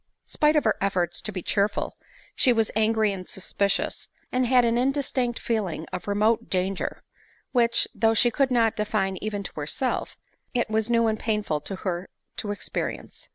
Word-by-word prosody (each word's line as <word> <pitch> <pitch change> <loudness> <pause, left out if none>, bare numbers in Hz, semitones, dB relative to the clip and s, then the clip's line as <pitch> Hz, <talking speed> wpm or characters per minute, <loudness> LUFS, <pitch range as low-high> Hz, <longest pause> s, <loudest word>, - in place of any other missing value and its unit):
Spite 300 +1 +2
of 300 - +4
her 220 - +2
efforts 180 -3 0
to 215 - -4
be 185 -3 -5
cheerful, 200 0 0 0.4
she 255 - +5
was 225 -2 +2
angry 220 -1 +2
and 185 -1 -7
suspicious, 200 +1 -1 0.2
and 255 0 +1
had 250 -1 +5
an 230 0 +2
indistinct 255 -1 0
feeling 195 -8 -2
of - - -5
remote 210 +3 +2
dan 185 +1 +1
ger; 190 - -5 0.5
which, 235 -2 +3
though 225 0 +2
she 240 +2 +5
could 275 +2 +2
not 230 -3 +3
define 200 -3 0
even 205 0 -3
to - - -6
herself, 155 - -2 0.4
it 240 -2 0
was 220 +1 +1
new 230 -1 +3
and 220 -1 0
painful 210 -9 -1
to 195 - -4
her 180 0 -2 0.3
to 210 - -3
experience. 205 - -4
215 Hz, 175 wpm, -26 LUFS, 195-235 Hz, 0.5 s, she